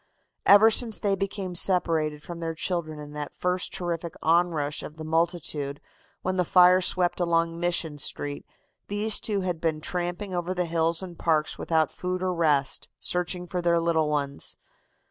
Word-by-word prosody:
"Ever 210 Hz, +3 st, +8 dB
since 225 Hz, -1 st, +3 dB
they 200 Hz, -1 st, 0 dB
became 195 Hz, -1 st, -3 dB
separated 165 Hz, -5 st, +1 dB
from 170 Hz, -1 st, -7 dB
their 165 Hz, -1 st, -3 dB
children 160 Hz, -2 st, -2 dB
in 150 Hz, 0 st, -9 dB
that 150 Hz, -1 st, -6 dB
first 180 Hz, 0 st, -1 dB
terrific 170 Hz, -2 st, -4 dB
onrush 160 Hz, -3 st, +2 dB
of 155 Hz, -, -9 dB
the 160 Hz, -, -7 dB
multitude 160 Hz, -3 st, -1 dB, 0.4 s
when 185 Hz, 0 st, -1 dB
the 180 Hz, -, +3 dB
fire 180 Hz, +1 st, +6 dB
swept 180 Hz, -1 st, +1 dB
along 165 Hz, -1 st, +1 dB
Mission 170 Hz, -3 st, 0 dB
Street 145 Hz, 0 st, -3 dB, 0.4 s
these 210 Hz, +1 st, -1 dB
two 205 Hz, -3 st, -1 dB
had 180 Hz, -3 st, -3 dB
been 160 Hz, -2 st, 0 dB
tramping 175 Hz, +4 st, -3 dB
over 175 Hz, +1 st, -2 dB
the 180 Hz, -1 st, 0 dB
hills 165 Hz, +1 st, 0 dB
and 175 Hz, -3 st, -9 dB
parks 155 Hz, -2 st, +1 dB
without 160 Hz, -2 st, +1 dB
food 185 Hz, 0 st, -3 dB
or 185 Hz, -1 st, 0 dB
rest, 150 Hz, -5 st, +1 dB
searching 180 Hz, 0 st, -1 dB
for 180 Hz, +1 st, -3 dB
their 170 Hz, -1 st, +3 dB
little 165 Hz, -2 st, +1 dB
ones. 140 Hz, -2 st, -2 dB
170 Hz, 165 wpm, -26 LUFS, 160-180 Hz, 0.4 s, Ever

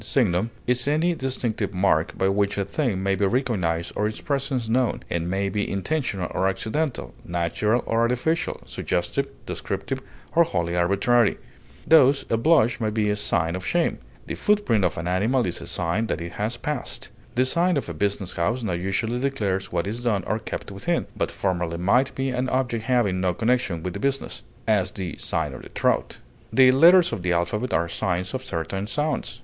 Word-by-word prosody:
signum) 110 Hz, -4 st, +1 dB, 0.2 s
is 125 Hz, +1 st, +1 dB
any 160 Hz, +4 st, +2 dB
distinctive 120 Hz, -, -2 dB
mark 90 Hz, -4 st, +2 dB
by 95 Hz, -, +2 dB
which 100 Hz, +1 st, +1 dB
a 100 Hz, -, 0 dB
thing 100 Hz, -3 st, -1 dB
may 95 Hz, 0 st, +2 dB
be 100 Hz, -, 0 dB
recognized 95 Hz, -8 st, 0 dB
or 105 Hz, -, +1 dB
its 110 Hz, -, -5 dB
presence 135 Hz, -4 st, -1 dB
known, 120 Hz, +1 st, +1 dB
and 85 Hz, 0 st, -1 dB
may 95 Hz, +2 st, 0 dB
be 105 Hz, +1 st, -1 dB
intentional 100 Hz, -, -1 dB
or 95 Hz, -, +1 dB
accidental, 110 Hz, -, -2 dB
natural 90 Hz, +7 st, 0 dB
or 115 Hz, -, 0 dB
artificial, 125 Hz, +8 st, 0 dB
suggestive, -, -, -1 dB, 0.2 s
descriptive, -, -, -3 dB, 0.3 s
or 170 Hz, +2 st, +6 dB
wholly 85 Hz, -, -1 dB
arbitrary; 100 Hz, +6 st, +3 dB, 0.5 s
thus, 140 Hz, -3 st, +5 dB
a -, -, +4 dB
blush 125 Hz, -2 st, +3 dB
may 110 Hz, -2 st, 0 dB
be 105 Hz, -1 st, +1 dB
a -, -, +1 dB
sign 90 Hz, -5 st, 0 dB
of 95 Hz, -, -5 dB
shame; 175 Hz, -, 0 dB, 0.3 s
the -, -, -4 dB
footprint 205 Hz, -, +2 dB
of -, -, +1 dB
an 85 Hz, -, -3 dB
animal 110 Hz, +8 st, +2 dB
is 90 Hz, -, -3 dB
a -, -, -8 dB
sign 90 Hz, +7 st, -1 dB
that -, -, -2 dB
it 85 Hz, 0 st, -6 dB
has 110 Hz, +3 st, -2 dB
passed; 145 Hz, +1 st, -4 dB, 0.3 s
the 130 Hz, +1 st, +3 dB
sign 170 Hz, +4 st, +2 dB
of 140 Hz, -, -2 dB
a 85 Hz, -, -4 dB
business 100 Hz, +2 st, -1 dB
house 115 Hz, +9 st, -1 dB
now 100 Hz, -5 st, -1 dB
usually 95 Hz, +7 st, -1 dB
declares 105 Hz, -9 st, -1 dB
what 85 Hz, 0 st, 0 dB
is 110 Hz, +4 st, -4 dB
done 110 Hz, -6 st, 0 dB
or 110 Hz, -, -1 dB
kept -, -, -6 dB
within, -, -, -1 dB
but -, -, -1 dB
formerly 90 Hz, -3 st, -2 dB
might 120 Hz, +10 st, +2 dB
be 135 Hz, 0 st, -1 dB
an 125 Hz, +1 st, -1 dB
object 120 Hz, -4 st, -1 dB
having 115 Hz, -8 st, +2 dB
no 90 Hz, -1 st, +1 dB
connection 110 Hz, -8 st, 0 dB
with 90 Hz, -, -3 dB
the 100 Hz, -, -5 dB
business, 135 Hz, +3 st, -2 dB, 0.3 s
as 105 Hz, -4 st, +3 dB
"the 90 Hz, -3 st, -4 dB
sign -, -, -1 dB
of -, -, -8 dB
the -, -, -12 dB
trout;" -, -, 0 dB, 0.3 s
the 130 Hz, -1 st, +7 dB
letters 170 Hz, +4 st, +6 dB
of 110 Hz, -, -3 dB
the 90 Hz, 0 st, 0 dB
alphabet 90 Hz, +8 st, 0 dB
are 85 Hz, +1 st, +1 dB
signs 90 Hz, +2 st, -2 dB
of 130 Hz, 0 st, -3 dB
certain 95 Hz, +3 st, -3 dB
sounds. 150 Hz, -3 st, -2 dB
110 Hz, 190 wpm, -24 LUFS, 95-130 Hz, 0.5 s, the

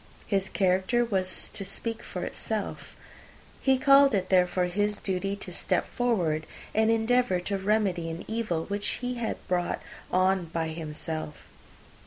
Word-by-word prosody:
His 195 Hz, -2 st, 0 dB
character 190 Hz, +5 st, +2 dB
was 190 Hz, -4 st, 0 dB
to 200 Hz, -, -6 dB
speak 225 Hz, +4 st, -2 dB
for -, -, -5 dB
itself. -, -, -4 dB, 0.7 s
He 265 Hz, -1 st, +4 dB
called 275 Hz, -2 st, +6 dB
it, 185 Hz, -2 st, -1 dB
therefore, 180 Hz, -1 st, +3 dB
his 205 Hz, +4 st, 0 dB
duty 195 Hz, +1 st, -2 dB
to 190 Hz, -3 st, -6 dB
step -, -, 0 dB
forward, 175 Hz, -11 st, 0 dB, 0.3 s
and 220 Hz, +1 st, +3 dB
endeavour 225 Hz, -3 st, +3 dB
to 200 Hz, +2 st, -2 dB
remedy 190 Hz, -4 st, +1 dB
an 165 Hz, +1 st, -6 dB
evil 215 Hz, -8 st, -1 dB
which 205 Hz, +1 st, -2 dB
had 245 Hz, -1 st, -3 dB
been 225 Hz, -, -1 dB
brought 175 Hz, -1 st, 0 dB, 0.3 s
on 185 Hz, 0 st, +3 dB
by 165 Hz, 0 st, -2 dB
himself. 155 Hz, -1 st, -5 dB
195 Hz, 145 wpm, -28 LUFS, 180-225 Hz, 0.7 s, called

